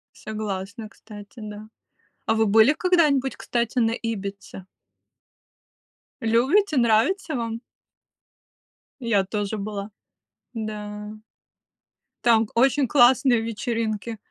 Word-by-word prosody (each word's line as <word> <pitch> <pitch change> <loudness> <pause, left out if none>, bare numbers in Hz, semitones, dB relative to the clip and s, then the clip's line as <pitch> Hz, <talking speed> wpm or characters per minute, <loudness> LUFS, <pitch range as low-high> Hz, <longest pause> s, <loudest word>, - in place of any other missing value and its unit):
Согласна, 215 0 -5
кстати, 205 -2 -13
да. 210 0 -8 0.6
А - - +2
вы 220 0 +2
были 220 +6 +6
когда-нибудь, 305 -6 +2
кстати, 240 +1 -2
на 225 -2 +3
Ибице? 200 -5 -5 1.6
Любите, 270 - +2
нравится 250 - +2
вам? 230 -1 -3 1.4
Я 230 -5 +2
тоже 205 +2 -3
была. 205 0 -5 0.6
Да. 210 -2 -6 1.1
Там 230 -2 +5
к 215 - -13
очень 270 +2 +3
классные 250 -1 +4
вечеринки. 225 -1 -3
225 Hz, 90 wpm, -24 LUFS, 210-245 Hz, 1.6 s, были